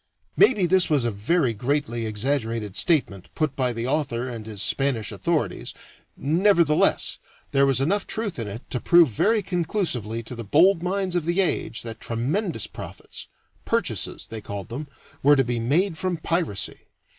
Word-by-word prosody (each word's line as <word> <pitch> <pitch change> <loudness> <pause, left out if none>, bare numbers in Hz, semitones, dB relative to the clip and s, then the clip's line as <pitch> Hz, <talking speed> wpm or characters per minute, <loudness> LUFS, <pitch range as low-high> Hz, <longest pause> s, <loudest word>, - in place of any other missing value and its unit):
Maybe 210 - +5
this 185 +1 +3
was 145 -6 +2
a 120 - +1
very 120 - +1
greatly 120 0 -1
exaggerated 110 -2 -1
statement 115 - +1
put 155 -4 -1
by 130 -2 +1
the 115 0 -4
author 130 -3 -1
and 115 -3 -7
his 105 -2 -7
Spanish 130 -3 0
authorities, - - -2 0.4
nevertheless 165 +1 +3 0.3
there 140 0 +4
was 135 -2 +2
enough 195 +9 0
truth 210 - -2
in 115 - -3
it 105 +5 -8
to 125 - -1
prove 170 0 +5
very 210 - +2
conclusively 165 - -2
to 115 - -7
the 115 - -6
bold 165 - +4
minds 185 0 -1
of 175 -3 0
the 175 +3 0
age 180 -10 0
that 115 -1 -7
tremendous 135 - -1
profits - - -9 0.4
"purchases" - - -1
they 110 -1 -7
called 100 0 -6
them 140 +6 -5 0.3
were 145 +2 +6
to 135 - +3
be 120 -1 -2
made 160 +8 +1
from 185 -2 -1
piracy. 165 - -2
140 Hz, 165 wpm, -24 LUFS, 115-175 Hz, 0.4 s, were